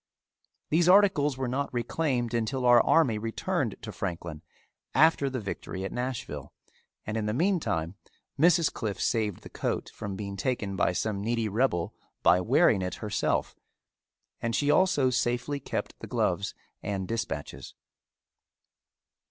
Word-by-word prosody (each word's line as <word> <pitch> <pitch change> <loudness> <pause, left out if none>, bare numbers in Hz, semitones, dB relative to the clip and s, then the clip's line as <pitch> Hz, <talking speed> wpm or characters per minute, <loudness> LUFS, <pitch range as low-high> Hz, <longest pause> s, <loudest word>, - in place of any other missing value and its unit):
These 170 +3 +4
articles 180 -8 +5
were 130 -1 -2
not 135 +3 -2
reclaimed 120 0 -1
until 120 +3 -1
our 120 -1 +7
army 125 -9 +3
returned 115 +1 -2
to - - -5
Franklin 85 -3 -5 0.5
after 145 0 +4
the 130 -1 -3
victory 95 -2 -5
at - - -4
Nashville 125 0 -4 0.5
and 105 +1 -3
in 105 -1 -1
the 105 - -1
meantime 150 - 0 0.5
Mrs. 170 +1 +4
Cliffe 105 -4 -3
saved 105 -5 0
the - - -10
coat - - -3
from 100 -1 -5
being 100 -1 -5
taken 105 -4 -2
by 95 - +2
some 100 +2 -2
needy 115 +1 0
rebel 105 -5 0 0.3
by 90 - +5
wearing 95 +1 +4
it 90 -1 -3
herself 105 -2 -1 0.9
and 115 -1 -1
she 145 0 +2
also 145 -9 +3
safely 125 +3 0
kept - - -4
the - - -8
gloves - - -1 0.3
and 95 -2 -3
dispatches. 115 0 -4
120 Hz, 140 wpm, -28 LUFS, 100-140 Hz, 0.9 s, our